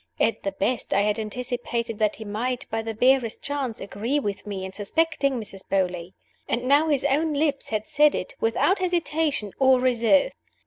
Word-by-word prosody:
At 225 Hz, -, +1 dB
the 195 Hz, -, -3 dB
best, 205 Hz, +2 st, -1 dB
I 200 Hz, -, +4 dB
had 210 Hz, +1 st, 0 dB
anticipated 235 Hz, 0 st, -3 dB
that 215 Hz, -1 st, +2 dB
he 220 Hz, -, -9 dB
might, 245 Hz, +5 st, -2 dB
by 225 Hz, 0 st, -1 dB
the 225 Hz, 0 st, -5 dB
barest 250 Hz, 0 st, +2 dB
chance, 275 Hz, -5 st, -3 dB
agree 225 Hz, +9 st, -2 dB
with 205 Hz, -5 st, -4 dB
me 195 Hz, -2 st, -4 dB
in 190 Hz, -, -8 dB
suspecting 275 Hz, +6 st, 0 dB
Mrs. 200 Hz, -3 st, -8 dB
Beauly. 180 Hz, -2 st, -1 dB, 0.3 s
And 240 Hz, -, -1 dB
now 285 Hz, +5 st, +4 dB
his 290 Hz, -4 st, +1 dB
own 305 Hz, +3 st, +2 dB
lips 290 Hz, -1 st, 0 dB
had 215 Hz, -1 st, -2 dB
said 300 Hz, 0 st, +4 dB
it, -, -, -4 dB
without 290 Hz, -, +2 dB
hesitation 320 Hz, -, 0 dB
or 265 Hz, -1 st, +5 dB
reserve! 255 Hz, -, +3 dB
240 Hz, 180 wpm, -25 LUFS, 210-280 Hz, 0.3 s, or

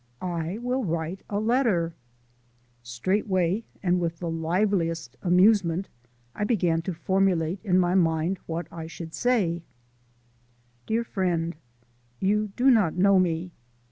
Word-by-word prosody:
"I 175 Hz, +1 st, -3 dB
will 250 Hz, +2 st, -1 dB
write 170 Hz, 0 st, -3 dB
a 205 Hz, -, -1 dB
letter!" 215 Hz, -8 st, +1 dB, 0.9 s
Straightway 185 Hz, -, 0 dB, 0.2 s
and 180 Hz, -1 st, +2 dB
with 170 Hz, -1 st, -2 dB
the 170 Hz, -1 st, -4 dB
liveliest 165 Hz, -, 0 dB
amusement 185 Hz, -1 st, +3 dB, 0.4 s
I -, -, -3 dB
began 180 Hz, -7 st, +1 dB
to 185 Hz, +2 st, -4 dB
formulate 185 Hz, -1 st, +1 dB
in 185 Hz, -4 st, +2 dB
my 180 Hz, -1 st, +3 dB
mind 170 Hz, 0 st, +1 dB
what 165 Hz, +1 st, -3 dB
I 165 Hz, -1 st, -7 dB
should 165 Hz, 0 st, -8 dB
say: 175 Hz, -4 st, +1 dB, 1.3 s
Dear 225 Hz, +2 st, +1 dB
Friend: 175 Hz, -6 st, -1 dB, 0.6 s
You 210 Hz, +2 st, +1 dB
do 260 Hz, +2 st, +5 dB
not 210 Hz, -9 st, +3 dB
know 195 Hz, +1 st, +5 dB
me. 175 Hz, 0 st, 0 dB
180 Hz, 125 wpm, -26 LUFS, 165-200 Hz, 1.3 s, do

